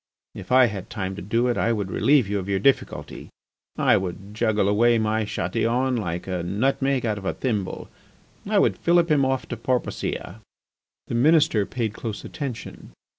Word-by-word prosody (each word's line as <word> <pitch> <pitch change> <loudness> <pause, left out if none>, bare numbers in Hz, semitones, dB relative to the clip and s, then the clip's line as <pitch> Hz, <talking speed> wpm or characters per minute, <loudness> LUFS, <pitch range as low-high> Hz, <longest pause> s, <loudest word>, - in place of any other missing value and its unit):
If - - -10
I 130 0 +7
had 105 -5 -5
time 95 -3 -4
to 100 - -7
do 115 +5 0
it 120 - 0
I 115 - +2
would 100 -4 -2
relieve 135 -5 +3
you 100 0 -1
of 95 +1 -6
your 100 - +1
difficulty. 135 +8 -1 0.5
I - - +4
would 95 +2 -5
juggle 110 -3 +1
away 115 +3 +4
my 110 0 0
Chatillon 115 +8 0
like 90 -6 -3
a 90 -2 -3
nutmeg 130 +8 0
out 105 -2 -1
of 95 - -11
a - - -1
thimble. 105 -7 -3 0.6
I - - +2
would - - +3
fillip 170 -1 +3
him 145 -2 +4
off 130 0 0
to 120 - -4
Porpoisia." 115 -4 -3 0.6
The - - -6
Minister 125 -5 +3
paid 115 -4 -3
close 110 -2 -6
attention. 135 -6 -7
110 Hz, 180 wpm, -24 LUFS, 100-130 Hz, 0.6 s, I